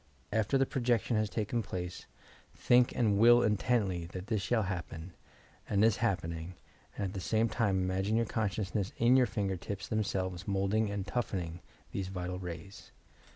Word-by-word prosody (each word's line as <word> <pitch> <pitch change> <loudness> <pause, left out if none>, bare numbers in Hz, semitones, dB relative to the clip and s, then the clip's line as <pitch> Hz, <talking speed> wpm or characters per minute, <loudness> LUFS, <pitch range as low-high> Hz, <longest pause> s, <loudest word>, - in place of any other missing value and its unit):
After 110 +5 +2
the 135 - +3
projection 120 -3 0
has 110 -1 +1
taken 115 +2 -1
place, 90 -3 -6 0.5
think 125 0 +4
and 105 -4 +2
will 120 +2 +7
intently 105 -5 +1
that 90 +1 -7
this 110 -3 -1
shall 110 +2 +1
happen, 85 -2 -5 0.6
and 105 +1 +4
is 110 -1 +3
happening, 85 -5 -2 0.4
and 100 - -2
at 95 - -4
the 100 - -4
same 110 +5 +1
time 110 -4 +1
imagine 95 +3 0
your 115 0 +2
consciousness 105 -2 -2
in 120 +2 +5
your 130 -2 +5
finger 100 -3 -1
tips 95 +1 -6
themselves, 95 -4 -2
moulding 100 +2 +1
and 100 -2 -3
"toughening" 90 -9 -3 0.3
these 95 -2 -3
vital 90 -1 -4
rays. 90 +2 -8
100 Hz, 160 wpm, -32 LUFS, 95-115 Hz, 0.6 s, will